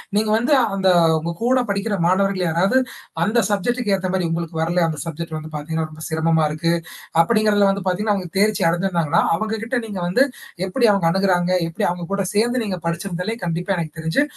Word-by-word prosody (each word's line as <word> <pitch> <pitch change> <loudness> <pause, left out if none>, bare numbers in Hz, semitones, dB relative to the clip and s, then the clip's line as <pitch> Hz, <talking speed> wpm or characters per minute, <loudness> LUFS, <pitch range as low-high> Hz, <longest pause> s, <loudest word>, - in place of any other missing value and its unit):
நீங்க 215 +1 +1
வந்து 240 +6 +2 0.2
அந்த 190 -1 +2 0.3
உங்க 165 +2 -3
கூட 255 +2 +3
படிக்கிற 200 +1 -1
மாணவர்கள் 190 0 +2
யாராவது 180 +10 +2 0.5
அந்த 220 +6 +2
சப்ஜெக்ட்டுக்கு 210 +2 -1
ஏத்த 185 -1 -3
மாரி 185 -2 0
உங்களுக்கு 165 0 -3
வரல, 170 +2 +1
அந்த 155 - -3
சப்ஜெக்ட் 165 0 -5
வந்து 155 0 -8
பார்த்தீங்கன்னா, 160 +2 -3
ரொம்ப 155 0 -11
சிரமமா 160 0 +1
இருக்கு. 165 +2 -1 0.5
அப்டிங்கிறத 210 +2 +3
வந்து 195 -1 -3
பார்த்தீங்கன்னா 205 +3 +1
அவங்க 185 -3 -5
தேர்ச்சி 210 +1 +2
அடைஞ்சிருந்தாங்கன்னா, 170 -2 +1
அவங்ககிட்ட 220 +4 -2
நீங்க 200 -4 -6
வந்து, 215 +10 +4 0.4
எப்படி 235 +5 +2
அவங்க 195 -4 +1
அணுகுறாங்க? 185 -2 +1 0.2
எப்படி 165 - -2
அவங்க 175 -1 -4
கூட 200 -1 0
சேர்ந்து 240 +3 +1
நீங்க 190 -4 -3
படிச்சிருந்தாலே 180 +5 -3
கண்டிப்பா 175 +3 -1
எனக்கு 160 -1 -5
தெரிஞ்சு, 160 - +1
185 Hz, 175 wpm, -21 LUFS, 165-210 Hz, 0.5 s, வந்து